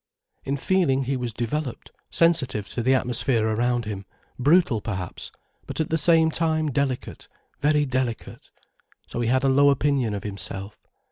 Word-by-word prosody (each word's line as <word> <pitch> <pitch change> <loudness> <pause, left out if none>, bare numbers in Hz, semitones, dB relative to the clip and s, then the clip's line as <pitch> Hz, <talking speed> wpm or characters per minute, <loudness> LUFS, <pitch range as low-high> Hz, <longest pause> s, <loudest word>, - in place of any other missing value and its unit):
In 140 +1 -2
feeling 140 -5 +1
he 135 +2 -1
was 125 -2 -3
developed, 125 +4 -4 0.2
sensitive 135 -11 +2
to 120 - -3
the 130 +3 +3
atmosphere 120 -2 0
around 120 +2 0
him, 100 -2 -5 0.3
brutal 145 - +3
perhaps, 95 -5 -5 0.4
but - - -4
at 160 - 0
the - - +2
same 160 0 +4
time 160 -2 0
delicate, 135 -1 -3 0.3
very 150 0 +2
delicate. 130 -4 -3 0.6
So 120 - -4
he 120 - 0
had 130 +2 +2
a - - +3
low 140 +2 +5
opinion 140 -5 +1
of 100 - -5
himself. 100 0 -4
130 Hz, 155 wpm, -24 LUFS, 115-145 Hz, 0.6 s, low